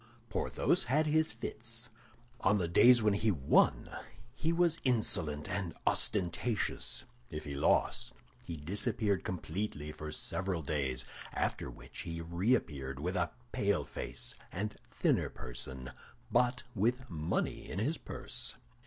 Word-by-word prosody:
Porthos - - +1
had 150 +5 +3
his 155 -1 +3
fits. 115 +1 -6 0.5
On 100 -1 +4
the 90 -4 0
days 120 +7 +7
when 105 -1 +4
he 105 +2 +2
won 75 -9 +4 0.5
he 160 - 0
was 170 -1 +3
insolent 90 - +1
and 95 -4 -2
ostentatious; 105 +3 +1 0.3
if 75 - -5
he 70 - -4
lost, 70 - +2 0.3
he 85 - -5
disappeared 100 - 0
completely 85 -3 -3
for 75 0 -6
several 90 +2 -1
days, 70 -4 0 0.3
after - - -1
which - - -10
he 85 0 -4
reappeared 85 - 0
with 90 +6 -1
a 85 -1 +1 0.2
pale 100 0 +1
face - - -3 0.2
and 105 +2 -3
thinner - - +2
person, 65 +1 -7 0.4
but 125 0 +3
with 120 +5 +1
money 80 -1 -1
in 85 - -4
his 140 +11 0
purse. - - -4
95 Hz, 130 wpm, -34 LUFS, 75-115 Hz, 0.5 s, days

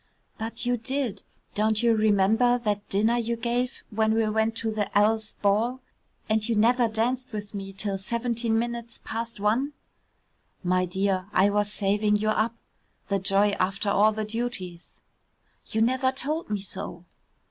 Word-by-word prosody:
"But 225 +2 -4
you 245 0 +1
did. 255 -1 -2 0.3
Don't 215 +1 +1
you 230 -1 +4
remember 220 +3 +3
that 210 -3 -2
dinner 220 +4 +2
you 235 0 -1
gave 240 +2 -2
when 220 +1 +2
we 225 -1 +2
went 220 +1 +1
to 225 -1 -1
the 215 -2 -1
L 215 +2 +4
's 220 0 -5
ball 220 +6 +1 0.5
and 215 +1 +1
you 230 - +2
never 235 +3 +4
danced 240 +4 -1
with 205 -2 -6
me 195 -1 -5
till 195 0 -2
seventeen 235 +2 -1
minutes 235 0 -3
past 230 0 -5
one?" 235 +8 +1 0.9
"My 185 0 +2
dear, 190 0 0
I 195 +2 +4
was 205 0 +1
saving 210 +1 +1
you 215 +1 +1
up. 220 +2 +1 0.5
The 200 -1 +1
joy 195 +2 +3
after 195 +2 0
all 210 +2 +5
the 215 0 -3
duties." 210 -6 -5 0.6
"You 220 - -1
never 260 +2 +2
told 295 +4 -2
me 205 -2 -1
so." 175 -2 -5
220 Hz, 160 wpm, -26 LUFS, 205-235 Hz, 0.9 s, all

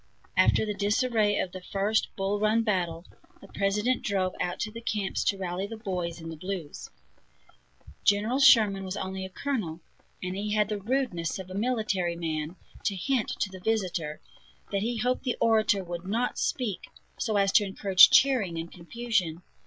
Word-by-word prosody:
After - - +4
the 210 - -2
disarray 210 +1 +1
of 180 - -1
the 185 0 -8
first 200 +3 0
Bull 195 +1 -1
Run 215 +2 +2
battle, 175 -5 -1 0.3
the 195 - -14
President 210 +6 0
drove 190 -3 0
out 175 0 -2
to 215 - -2
the 230 +1 -8
camps 210 -4 -1
to 200 - +2
rally 185 +1 -3
the 225 +1 -7
"boys 180 -6 -3
in 165 0 -7
the 165 - -6
blues." 180 -2 -6 1.1
General 215 +6 +2
Sherman 220 -8 +6
was 190 +1 -4
only 190 -1 -4
a - - -7
colonel, 195 - -3 0.4
and 185 0 -3
he 210 +1 -2
had 210 -1 +2
the 210 -2 -3
rudeness 215 -8 -1
of 185 -1 -8
a - - -6
military 205 -5 0
man 160 -1 -3 0.3
to 200 - +1
hint 245 +5 0
to 195 - 0
the 190 - -9
visitor 180 -7 -1 0.5
that 200 -1 0
he 235 +2 -1
hoped 250 +3 0
the 250 -2 -2
orator 215 -3 +3
would 175 0 -6
not 230 +5 -1
speak 230 -8 -2 0.3
so 215 -3 0
as 195 -1 +3
to 210 - +5
encourage 195 -1 +6
cheering 240 -11 +4
and 165 +1 -5
confusion. 180 -3 -2
200 Hz, 175 wpm, -28 LUFS, 180-220 Hz, 1.1 s, Sherman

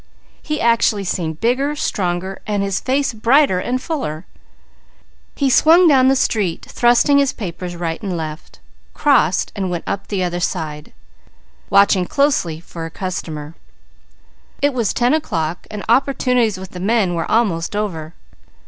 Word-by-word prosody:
He 305 -1 -3
actually 230 -3 +2
seemed 160 -4 -3
bigger, 270 +5 0
stronger, 185 -6 -2
and 205 -2 0
his 195 -1 -1
face 270 0 0
brighter 230 -2 +3
and 250 +6 -2
fuller. 255 - -4 1.1
He 280 - +1
swung 330 +7 +6
down 265 -4 +5
the 270 - +4
street 205 -9 -1
thrusting 245 +4 +3
his 280 -2 +2
papers 175 -3 -6
right 165 -1 -4
and 190 -5 -3
left, 155 0 -7 0.4
crossed 220 - +2
and 195 -3 -2
went 175 -2 -3
up 195 - -4
the 195 -3 -1
other 175 0 -2
side, 155 -4 -4 0.8
watching 195 -2 +4
closely 270 - +1
for 165 -1 -8
a - - -9
customer. 160 -4 -5 1.1
It 285 0 +1
was 235 -5 0
ten 245 +2 +1
o'clock 170 - -2
and 210 -1 -7
opportunities 250 -3 +2
with 190 0 -9
the 180 - -8
men 200 -1 +1
were 165 -1 -3
almost 200 -6 0
over. 170 -6 -4
200 Hz, 150 wpm, -19 LUFS, 175-255 Hz, 1.1 s, swung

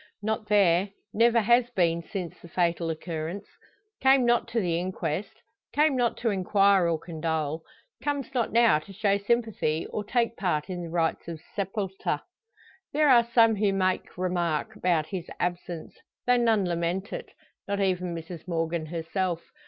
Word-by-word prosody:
Not 220 0 -2
there 195 -2 +4 0.2
never 230 +1 +4
has 240 +3 +4
been 170 -7 +1
since 180 0 -5
the - - -11
fatal 170 -1 0
occurrence. 165 +3 -4 0.6
Came 265 -1 +5
not 240 0 +3
to 235 0 -1
the 170 -5 0
inquest, 185 +2 -4 0.3
came 300 -1 +3
not 245 -2 +1
to 230 -2 0
inquire 195 -1 +3
or 165 - +1
condole; 160 -2 -3 0.4
comes 285 -4 -2
not 240 -3 0
now 230 -8 +5
to 175 +6 -13
show 200 0 +1
sympathy, 205 -8 0
or 210 - -3
take 235 +1 0
part 175 -2 -1
in 180 -1 -4
the 170 - -6
rites 165 -1 -1
of 165 -2 -6 0.2
sepulture. 195 -1 -2 0.7
There 300 0 +3
are 235 -2 +5
some 230 -2 +5
who 200 -1 +2
make 185 -2 -1
remark 180 +2 -1
about 175 -6 +1
his 180 -2 -6
absence, 175 -2 -3 0.3
though 245 0 +4
none 225 -4 +3
lament 175 +3 -2
it - - -6 0.4
not 200 0 -1
even 180 -3 0
Mrs 165 +1 -8
Morgan 165 -1 -1
herself. 170 +1 -2
190 Hz, 160 wpm, -27 LUFS, 170-225 Hz, 0.7 s, Came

